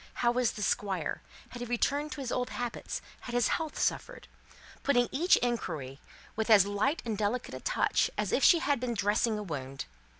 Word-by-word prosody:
How 240 Hz, -, +5 dB
was 245 Hz, -1 st, +1 dB
the 210 Hz, -, -4 dB
Squire? 190 Hz, -8 st, -1 dB, 0.3 s
Had 245 Hz, -, -9 dB
he -, -, -2 dB
returned 285 Hz, +5 st, 0 dB
to 280 Hz, -, -6 dB
his 255 Hz, -, -4 dB
old 250 Hz, 0 st, -1 dB
habits? 245 Hz, -1 st, -4 dB, 0.2 s
Had 240 Hz, -, -6 dB
his 245 Hz, -3 st, +3 dB
health 320 Hz, -3 st, -2 dB
suffered? -, -, -2 dB, 0.5 s
putting 245 Hz, -4 st, +3 dB
each 335 Hz, +7 st, +4 dB
inquiry 160 Hz, -, -3 dB, 0.4 s
with 220 Hz, +1 st, -2 dB
as 205 Hz, -4 st, +8 dB
light 205 Hz, +10 st, 0 dB
and 225 Hz, -2 st, -1 dB
delicate 215 Hz, +4 st, -2 dB
a -, -, -5 dB
touch -, -, +1 dB
as -, -, -1 dB
if -, -, +1 dB
she 345 Hz, -, +8 dB
had 285 Hz, -5 st, +1 dB
been 245 Hz, -1 st, -2 dB
dressing 215 Hz, +2 st, +1 dB
a 210 Hz, -, -4 dB
wound. 135 Hz, -6 st, -5 dB
235 Hz, 195 wpm, -30 LUFS, 205-250 Hz, 0.5 s, as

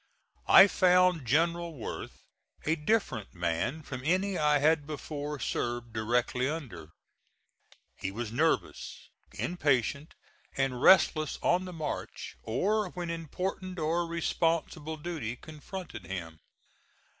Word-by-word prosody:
I 190 Hz, -, +10 dB
found 180 Hz, -6 st, +3 dB
General 170 Hz, +4 st, +1 dB
Worth 120 Hz, -, -7 dB, 0.4 s
a 155 Hz, -, +3 dB
different 150 Hz, -, -1 dB
man 90 Hz, -, -1 dB
from 130 Hz, -3 st, -7 dB
any 185 Hz, +5 st, +1 dB
I 150 Hz, -3 st, +3 dB
had 150 Hz, 0 st, +2 dB
before 150 Hz, 0 st, -5 dB
served 120 Hz, -3 st, -3 dB
directly 120 Hz, +3 st, 0 dB
under. 110 Hz, -, -6 dB, 1.1 s
He 95 Hz, -, -3 dB
was 110 Hz, +2 st, -5 dB
nervous, 160 Hz, +7 st, -1 dB, 0.2 s
impatient 145 Hz, -3 st, 0 dB, 0.4 s
and 135 Hz, -2 st, 0 dB
restless 155 Hz, -3 st, +5 dB
on 180 Hz, +2 st, +2 dB
the 180 Hz, -, -6 dB
march, 155 Hz, -3 st, -5 dB
or 200 Hz, -, 0 dB
when 175 Hz, -1 st, -4 dB
important 185 Hz, +3 st, -4 dB
or 165 Hz, +2 st, 0 dB
responsible 165 Hz, -2 st, -1 dB
duty 150 Hz, -8 st, -4 dB
confronted 155 Hz, -, -9 dB
him. 85 Hz, -4 st, -6 dB
155 Hz, 110 wpm, -30 LUFS, 125-170 Hz, 1.1 s, I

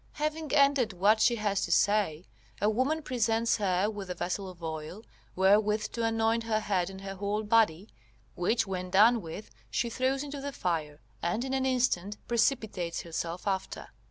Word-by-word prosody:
Having 305 Hz, +1 st, -3 dB
ended 280 Hz, -6 st, +4 dB
what 205 Hz, +5 st, +3 dB
she 240 Hz, -, +4 dB
has 205 Hz, -3 st, 0 dB
to -, -, -3 dB
say, 195 Hz, -5 st, +2 dB, 0.3 s
a 205 Hz, -, +2 dB
woman 260 Hz, +9 st, +1 dB
presents 230 Hz, -2 st, +1 dB
her 190 Hz, -2 st, +1 dB
with 205 Hz, -3 st, -6 dB
a 180 Hz, -, -3 dB
vessel 185 Hz, +2 st, -3 dB
of 175 Hz, -2 st, -13 dB
oil, 160 Hz, +6 st, -6 dB, 0.3 s
wherewith 210 Hz, +3 st, +3 dB
to 235 Hz, -, -3 dB
anoint 225 Hz, 0 st, +1 dB
her 220 Hz, -1 st, +1 dB
head 190 Hz, -4 st, 0 dB
and 190 Hz, 0 st, -9 dB
her 195 Hz, 0 st, -6 dB
whole 205 Hz, +2 st, -2 dB
body, 210 Hz, -4 st, +2 dB, 0.5 s
which 220 Hz, +7 st, +1 dB
when 185 Hz, -2 st, -4 dB
done 220 Hz, +5 st, +5 dB
with 165 Hz, +5 st, -8 dB, 0.2 s
she 230 Hz, -, -1 dB
throws 265 Hz, +3 st, 0 dB
into 285 Hz, -1 st, -6 dB
the 280 Hz, +1 st, -4 dB
fire, 160 Hz, -, -3 dB, 0.2 s
and 195 Hz, +9 st, -1 dB
in 265 Hz, -, -3 dB
an 265 Hz, 0 st, +1 dB
instant 210 Hz, -6 st, 0 dB
precipitates 220 Hz, -8 st, 0 dB
herself 170 Hz, +1 st, -5 dB
after. 190 Hz, -2 st, -3 dB
210 Hz, 175 wpm, -29 LUFS, 185-235 Hz, 0.5 s, done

